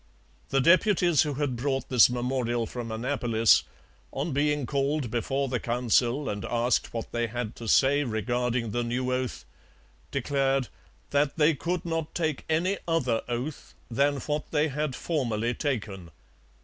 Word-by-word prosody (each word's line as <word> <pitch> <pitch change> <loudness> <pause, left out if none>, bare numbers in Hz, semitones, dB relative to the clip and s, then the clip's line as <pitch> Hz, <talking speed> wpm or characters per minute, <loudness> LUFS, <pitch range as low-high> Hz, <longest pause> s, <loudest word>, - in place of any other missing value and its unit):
The 135 - +2
deputies 175 0 +4
who 150 -2 -1
had 140 -3 -1
brought 135 +2 -2
this 125 -3 +6
memorial 120 -1 -1
from 115 0 -6
Annapolis, 115 -2 +3 0.5
on 145 +5 -3
being 145 0 +1
called 140 -2 -1
before 135 +4 -1
the 125 -2 -1
Council 120 +3 +1
and 100 -1 -3
asked 120 +3 0
what 115 -1 -5
they 120 0 -1
had 115 -1 -4
to 115 - -7
say 140 +6 +4
regarding 120 0 -1
the 120 +3 -1
new 125 +2 -1
oath, 125 -1 -3 0.6
declared 135 -1 0 0.4
'that 145 +1 +1
they 155 +1 +4
could 170 +5 -3
not 165 -2 -3
take 155 -4 -1
any 180 +5 +1
other 130 -9 +1
oath 125 +5 -5 0.2
than 140 +4 +2
what 150 +2 -3
they 155 0 +1
had 150 -1 -2
formerly 120 -7 -1
taken.' 105 - -3
130 Hz, 150 wpm, -27 LUFS, 120-150 Hz, 0.6 s, this